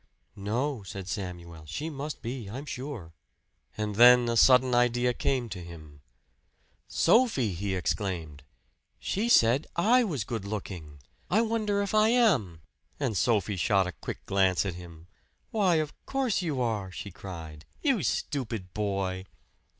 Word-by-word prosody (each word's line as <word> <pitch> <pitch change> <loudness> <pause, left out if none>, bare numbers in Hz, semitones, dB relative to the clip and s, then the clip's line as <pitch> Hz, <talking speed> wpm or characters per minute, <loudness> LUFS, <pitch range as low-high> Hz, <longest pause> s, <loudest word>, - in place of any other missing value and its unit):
"No," 115 +6 -2
said 95 -1 -8
Samuel. 85 -5 -6
"She 145 - -4
must 145 +1 -6
be, 120 -3 -5
I'm 130 +7 -6
sure." 125 - -6 0.6
And 105 -1 -3
then 120 +1 +8
a 115 - 0
sudden 125 +1 +5
idea 120 0 +2
came 125 -1 -1
to 90 -3 -6
him. 80 -4 -12 0.9
"Sophie!" 175 - +3
he 95 +2 -2
exclaimed 90 -6 -3 0.6
"she 220 +5 -2
said 125 - +4
I 235 +8 +4
was 155 - -2
good 110 -1 -4
looking! 90 -8 -6 0.3
I 210 +5 +3
wonder 215 -3 0
if 200 - -4
I 215 0 +5
am." 145 - +2 0.4
And 110 - -1
Sophie 105 0 +1
shot 95 +1 +2
a 90 - -3
quick 80 - -8
glance 95 -1 +2
at 95 - -2
him. 85 -2 -11 0.5
"Why, 195 -6 +3
of 155 -2 -1
course 265 -7 0
you 155 -7 -2
are!" 105 -5 -2
she 100 +2 -7
cried. 80 -5 -9 0.2
"You 270 - +2
stupid 115 - -3
boy!" 95 -3 -2
110 Hz, 145 wpm, -28 LUFS, 95-145 Hz, 0.9 s, then